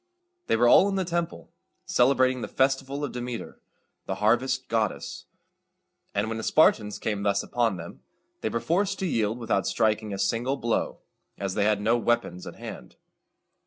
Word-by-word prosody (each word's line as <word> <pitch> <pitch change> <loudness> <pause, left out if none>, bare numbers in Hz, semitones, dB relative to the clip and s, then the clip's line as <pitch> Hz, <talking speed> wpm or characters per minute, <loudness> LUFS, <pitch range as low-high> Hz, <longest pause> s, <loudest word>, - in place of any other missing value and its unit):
They - - +3
were 120 +2 +4
all 195 +10 +7
in 195 - -1
the 190 -1 0
temple, 170 -1 -3 0.3
celebrating 130 0 +3
the - - -3
festival 135 +1 0
of 145 - -2
Demeter, 125 -1 -6 0.5
the - - -2
harvest 125 +5 +1
goddess; 110 -3 -2 0.9
and 105 +2 +1
when 115 0 -3
the - - -5
Spartans 110 -9 +3
came 105 -2 -2
thus 100 -1 +1
upon 115 -5 0
them, 85 0 -9 0.4
they - - -1
were 115 - -1
forced 195 - 0
to 190 - -2
yield 115 - 0
without 115 -2 0
striking 110 -1 +1
a 100 - -3
single 115 +8 0
blow, 120 -3 -1 0.4
as 95 -1 -3
they 105 0 +1
had 105 -1 +2
no 115 +3 +2
weapons 120 -6 -1
at - - -8
hand. - - -9
120 Hz, 170 wpm, -26 LUFS, 105-135 Hz, 0.9 s, all